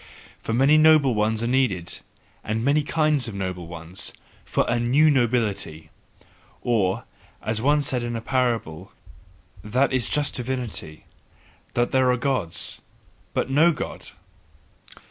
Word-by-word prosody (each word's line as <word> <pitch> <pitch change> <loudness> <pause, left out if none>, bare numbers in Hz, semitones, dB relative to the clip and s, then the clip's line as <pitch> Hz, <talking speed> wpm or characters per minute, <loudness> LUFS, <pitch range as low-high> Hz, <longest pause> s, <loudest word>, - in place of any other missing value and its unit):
For - - -5
many 135 +6 +5
noble 155 -4 +5
ones 110 +1 0
are - - 0
needed, 120 -9 0 0.4
and 110 +2 -2
many 145 +2 +3
kinds 150 -3 +1
of 110 - -6
noble 90 -3 -4
ones, 85 +2 -7 0.3
FOR - - 0
A 120 - +1
NEW 140 +6 +4
NOBILITY! 110 - -1 0.7
Or, 105 -6 +1 0.4
as 110 +3 -1
I - - -6
once 145 0 +3
said 125 -2 0
in 120 -1 -3
parable: 115 -10 -1 0.7
"That 125 +6 +1
is 130 -3 +1
just 150 -1 +1
divinity, 120 -11 -4 0.7
that 120 0 +1
there 130 -1 +3
are 125 - +1
Gods, 120 -11 -1 0.5
but 135 - -1
no 160 +5 +5
God!" 150 - -5
120 Hz, 135 wpm, -24 LUFS, 105-135 Hz, 0.7 s, many